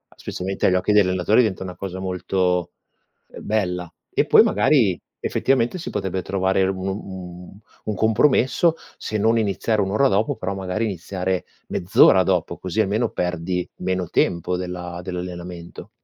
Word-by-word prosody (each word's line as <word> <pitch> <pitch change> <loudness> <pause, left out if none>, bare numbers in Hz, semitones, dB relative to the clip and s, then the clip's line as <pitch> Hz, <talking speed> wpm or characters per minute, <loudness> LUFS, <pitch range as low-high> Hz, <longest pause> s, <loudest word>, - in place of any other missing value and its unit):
specialmente 95 +2 -2
agli 90 - +3
occhi 95 +3 +1
degli 105 -2 +6
allenatori, 95 +5 +3
diventa 100 -6 -1
una 90 -1 -7
cosa 95 -1 -6
molto, 90 -1 -1 0.6
ehm, - - -10
bella. 90 -5 -1 0.2
E - - +2
poi - - +7
magari, 105 - +3 0.2
effettivamente, 130 +4 +1
si 175 - -6
potrebbe 95 -2 -2
trovare 95 0 +1
un 95 0 -2
un 95 -1 -7 0.2
un 105 - -3
compromesso, 130 - +3 0.2
se 110 - -3
non 110 +3 +3
iniziare 105 0 0
1 95 -1 -1
ora 135 +7 +3
dopo 105 -2 +1
però 100 -2 -4
magari 95 +3 -2
iniziare 95 -1 -3 0.2
mezz'ora 95 0 +5
dopo, 90 -3 0
così 95 +4 -1
almeno 110 +3 0
perdi 90 0 -2
meno 90 -1 -2
tempo 85 +1 0
dell'a 90 -1 -5
dell'allenamento. 90 -1 -7
95 Hz, 150 wpm, -22 LUFS, 90-105 Hz, 0.6 s, poi